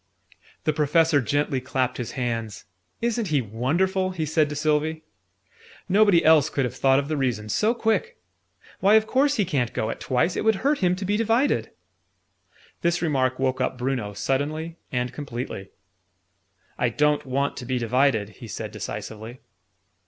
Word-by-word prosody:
The 155 Hz, -, +1 dB
Professor 150 Hz, 0 st, +3 dB
gently 140 Hz, +2 st, 0 dB
clapped 130 Hz, -1 st, -1 dB
his 120 Hz, -3 st, -5 dB
hands. 115 Hz, -5 st, -3 dB, 0.4 s
"Isn't 235 Hz, -2 st, 0 dB
he 150 Hz, -4 st, +2 dB
wonderful!" 165 Hz, -, 0 dB
he 170 Hz, -4 st, -3 dB
said 155 Hz, 0 st, +2 dB
to 150 Hz, -, -5 dB
Sylvie. 155 Hz, +1 st, 0 dB, 0.8 s
"Nobody 200 Hz, -2 st, +4 dB
else 155 Hz, -2 st, +6 dB
could 135 Hz, -3 st, 0 dB
have 125 Hz, -, -4 dB
thought 135 Hz, 0 st, +3 dB
of 140 Hz, 0 st, 0 dB
the 155 Hz, -, -1 dB
reason, 120 Hz, -6 st, -1 dB
so 220 Hz, -, +2 dB
quick. 350 Hz, -, 0 dB, 0.6 s
Why, 200 Hz, +3 st, +5 dB
of 220 Hz, 0 st, +5 dB
course 280 Hz, +5 st, +2 dB
he 205 Hz, -, +1 dB
ca'n't 130 Hz, -8 st, -1 dB
go 110 Hz, -, -1 dB
at -, -, -7 dB
twice! 130 Hz, +8 st, 0 dB
It -, -, -1 dB
would 220 Hz, -1 st, +3 dB
hurt 290 Hz, +1 st, +3 dB
him 180 Hz, -2 st, +2 dB
to 190 Hz, +1 st, -5 dB
be 205 Hz, +2 st, +1 dB
divided." 230 Hz, +5 st, +1 dB, 1.1 s
This 170 Hz, 0 st, +1 dB
remark 130 Hz, -5 st, +1 dB
woke 130 Hz, 0 st, 0 dB
up 130 Hz, 0 st, -1 dB
Bruno, 125 Hz, -5 st, -2 dB
suddenly 155 Hz, +8 st, -2 dB, 0.2 s
and 125 Hz, -2 st, -2 dB
completely. 120 Hz, -8 st, -6 dB, 1.1 s
"I 120 Hz, -, +2 dB
don't 150 Hz, +4 st, +1 dB
want 140 Hz, +1 st, -1 dB
to 125 Hz, -, -6 dB
be 130 Hz, 0 st, 0 dB
divided," 120 Hz, -2 st, +1 dB
he 115 Hz, +3 st, -12 dB
said 105 Hz, -, -6 dB
decisively. 110 Hz, +3 st, -7 dB
145 Hz, 165 wpm, -24 LUFS, 125-175 Hz, 1.1 s, else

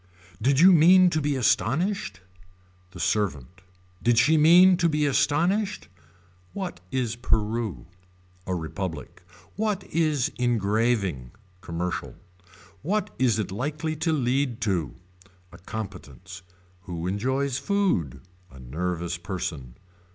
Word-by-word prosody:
Did 135 Hz, +1 st, +2 dB
you 185 Hz, +4 st, +8 dB
mean 180 Hz, +2 st, +6 dB
to 155 Hz, -, 0 dB
be 145 Hz, -1 st, 0 dB
astonished. 130 Hz, -, 0 dB, 0.7 s
The 90 Hz, -1 st, -12 dB
servant. 90 Hz, -, -2 dB, 0.4 s
Did 120 Hz, -1 st, +2 dB
she 150 Hz, +7 st, +5 dB
mean 175 Hz, +4 st, +7 dB
to 170 Hz, -1 st, +2 dB
be 150 Hz, -1 st, +1 dB
astonished. 175 Hz, -, 0 dB, 0.6 s
What 190 Hz, -, -5 dB
is 120 Hz, -2 st, -2 dB
Peru. 110 Hz, -2 st, -1 dB, 0.6 s
A 95 Hz, -, -1 dB
republic. 80 Hz, 0 st, -6 dB, 0.4 s
What 210 Hz, -2 st, -1 dB
is 155 Hz, -6 st, +1 dB
engraving. 105 Hz, -, 0 dB, 0.3 s
Commercial. 85 Hz, +1 st, -4 dB, 0.7 s
What 205 Hz, +6 st, -1 dB
is 125 Hz, -5 st, +2 dB
it 105 Hz, -4 st, -3 dB
likely 150 Hz, +9 st, -3 dB
to 160 Hz, +2 st, 0 dB
lead 130 Hz, -3 st, 0 dB
to. 90 Hz, -, -1 dB, 0.6 s
A -, -, -14 dB
competence. 95 Hz, -1 st, -8 dB, 0.4 s
Who 85 Hz, -2 st, -5 dB
enjoys 130 Hz, +8 st, -1 dB
food. 195 Hz, -, 0 dB, 0.3 s
A 65 Hz, -, -15 dB
nervous 85 Hz, +6 st, -3 dB
person. 80 Hz, -9 st, -5 dB
120 Hz, 115 wpm, -25 LUFS, -, 0.7 s, you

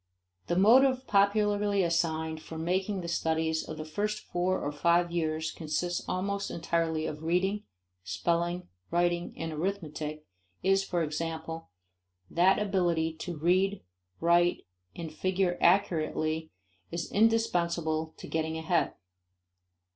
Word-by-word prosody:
The 175 Hz, -, +1 dB
motive 255 Hz, +7 st, +5 dB
popularly 205 Hz, -1 st, +3 dB
assigned 160 Hz, -2 st, 0 dB
for 160 Hz, -, -8 dB
making 185 Hz, +4 st, -1 dB
the 170 Hz, -, -5 dB
studies 160 Hz, -1 st, 0 dB
of 155 Hz, -, -5 dB
the 155 Hz, -, -5 dB
first 210 Hz, +6 st, -2 dB
four 180 Hz, +1 st, 0 dB
or 145 Hz, -, -2 dB
five 170 Hz, +3 st, +2 dB
years 160 Hz, -2 st, -1 dB
consist 170 Hz, +2 st, -2 dB
almost 200 Hz, +2 st, -1 dB
entirely 165 Hz, -1 st, -1 dB
of 150 Hz, -1 st, -5 dB
reading, 185 Hz, +5 st, 0 dB, 0.4 s
spelling, 170 Hz, -, -1 dB, 0.2 s
writing, 175 Hz, 0 st, +1 dB
and 165 Hz, -1 st, -4 dB
arithmetic, 155 Hz, -3 st, -3 dB, 0.4 s
is, 195 Hz, +1 st, +3 dB
for 175 Hz, -3 st, -1 dB
example, 160 Hz, -, -4 dB, 0.6 s
that 180 Hz, +3 st, +4 dB
ability 175 Hz, -6 st, +1 dB
to 170 Hz, 0 st, -5 dB
read, 185 Hz, +5 st, +2 dB, 0.4 s
write, 175 Hz, +1 st, +3 dB, 0.3 s
and 160 Hz, -2 st, -6 dB
figure 185 Hz, +2 st, 0 dB
accurately 160 Hz, -3 st, +2 dB, 0.4 s
is 170 Hz, -1 st, -4 dB
indispensable 170 Hz, -8 st, +1 dB
to -, -, -9 dB
getting 160 Hz, 0 st, -2 dB
ahead. 165 Hz, +1 st, 0 dB
170 Hz, 120 wpm, -29 LUFS, 160-190 Hz, 0.6 s, motive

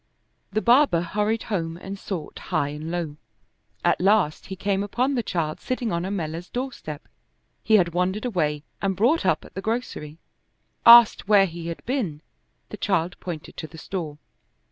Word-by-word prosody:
The 215 Hz, -, -1 dB
barber 240 Hz, -, +5 dB
hurried 210 Hz, +5 st, -1 dB
home 165 Hz, -6 st, -3 dB
and 195 Hz, +2 st, -7 dB
sought 175 Hz, -8 st, -6 dB
high 140 Hz, -, +1 dB
and 150 Hz, +2 st, -6 dB
low. 165 Hz, -4 st, -3 dB, 0.7 s
At -, -, +3 dB
last 190 Hz, -5 st, +2 dB
he 190 Hz, -, -5 dB
came 195 Hz, 0 st, 0 dB
upon 245 Hz, +7 st, 0 dB
the 250 Hz, -, +1 dB
child 165 Hz, -7 st, -2 dB
sitting 250 Hz, -3 st, -2 dB
on 170 Hz, +1 st, -1 dB
Ammella's 175 Hz, -3 st, -4 dB
doorstep; 245 Hz, -, -5 dB, 0.5 s
he 220 Hz, -, +3 dB
had 175 Hz, -5 st, +3 dB
wandered 185 Hz, +5 st, 0 dB
away 150 Hz, -10 st, -1 dB, 0.2 s
and 195 Hz, -1 st, 0 dB
brought 250 Hz, -, +2 dB
up -, -, +1 dB
at -, -, -15 dB
the 195 Hz, -, -5 dB
grocery; 215 Hz, -9 st, -3 dB, 0.7 s
asked 235 Hz, -4 st, +9 dB
where 205 Hz, -2 st, +6 dB
he 170 Hz, -2 st, -7 dB
had 170 Hz, -, -6 dB
been, 205 Hz, -, -2 dB, 0.5 s
the -, -, -7 dB
child 180 Hz, -3 st, 0 dB
pointed 165 Hz, -4 st, -7 dB
to 155 Hz, -, -5 dB
the 160 Hz, +2 st, -13 dB
store. 160 Hz, -3 st, -5 dB
185 Hz, 165 wpm, -24 LUFS, 165-215 Hz, 0.7 s, asked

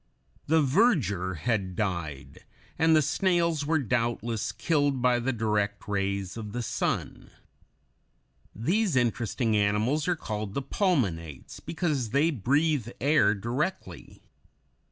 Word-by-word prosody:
The 160 Hz, +1 st, +4 dB
verdure 130 Hz, -, +2 dB
had 95 Hz, 0 st, -1 dB
died, 85 Hz, -8 st, -4 dB, 0.4 s
and 160 Hz, 0 st, +5 dB
the 155 Hz, -, +4 dB
snails 170 Hz, -2 st, +1 dB
were 160 Hz, +1 st, +3 dB
doubtless 120 Hz, -3 st, -1 dB
killed 145 Hz, -5 st, 0 dB
by 125 Hz, -1 st, +3 dB
the 125 Hz, +2 st, 0 dB
direct 105 Hz, -3 st, -1 dB
rays 100 Hz, -1 st, -2 dB
of 105 Hz, -2 st, -7 dB
the 120 Hz, 0 st, -3 dB
sun. -, -, -3 dB, 1.3 s
These 175 Hz, -, +1 dB
interesting 120 Hz, -1 st, 0 dB
animals 105 Hz, -, +1 dB
are 180 Hz, -, +2 dB
called 105 Hz, -8 st, -5 dB, 0.2 s
pulmonates 95 Hz, -, -1 dB
because 150 Hz, -9 st, -2 dB
they 145 Hz, +8 st, +2 dB
breathe 140 Hz, +1 st, +1 dB
air 130 Hz, -7 st, +3 dB
directly. 130 Hz, -, -4 dB
120 Hz, 115 wpm, -27 LUFS, 105-155 Hz, 1.3 s, and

